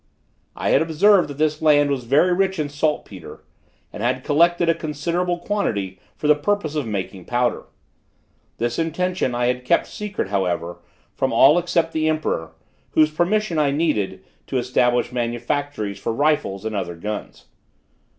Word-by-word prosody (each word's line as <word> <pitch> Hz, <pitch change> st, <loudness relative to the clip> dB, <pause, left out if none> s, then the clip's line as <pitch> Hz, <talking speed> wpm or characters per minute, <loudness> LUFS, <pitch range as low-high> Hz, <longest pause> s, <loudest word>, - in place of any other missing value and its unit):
I -, -, -2 dB
had -, -, +4 dB
observed 175 Hz, +5 st, +4 dB
that 145 Hz, -1 st, -8 dB
this 155 Hz, 0 st, 0 dB
land 145 Hz, -2 st, +4 dB
was 130 Hz, -3 st, -2 dB
very 150 Hz, +9 st, +3 dB
rich 190 Hz, +1 st, +1 dB
in 150 Hz, -2 st, -2 dB
saltpetre, 145 Hz, -, -3 dB, 0.5 s
and -, -, -7 dB
had 130 Hz, +2 st, 0 dB
collected 170 Hz, +3 st, +3 dB
a 165 Hz, -, +5 dB
considerable 170 Hz, +3 st, -2 dB
quantity 110 Hz, -, -2 dB, 0.2 s
for -, -, -7 dB
the 150 Hz, -, +7 dB
purpose 155 Hz, 0 st, -1 dB
of 150 Hz, -6 st, -2 dB
making 95 Hz, -3 st, -4 dB
powder. 120 Hz, 0 st, 0 dB, 0.9 s
This 120 Hz, +3 st, -2 dB
intention 165 Hz, -4 st, -1 dB
I 120 Hz, 0 st, 0 dB
had 125 Hz, +1 st, 0 dB
kept 170 Hz, +7 st, +2 dB
secret, 210 Hz, -, -5 dB
however, 90 Hz, -3 st, -2 dB, 0.3 s
from -, -, -1 dB
all 150 Hz, +6 st, +6 dB
except 170 Hz, -1 st, 0 dB
the 155 Hz, 0 st, +1 dB
emperor, 155 Hz, -, -2 dB, 0.4 s
whose 155 Hz, -1 st, +4 dB
permission 175 Hz, +1 st, 0 dB
I 145 Hz, -2 st, +3 dB
needed 110 Hz, -, -1 dB, 0.2 s
to 135 Hz, -, -2 dB
establish 125 Hz, 0 st, +1 dB
manufactories 120 Hz, -1 st, -3 dB
for -, -, -2 dB
rifles 115 Hz, -7 st, 0 dB
and 110 Hz, -1 st, -3 dB
other 85 Hz, -3 st, -3 dB
guns. 105 Hz, +5 st, -6 dB
145 Hz, 155 wpm, -22 LUFS, 120-165 Hz, 0.9 s, the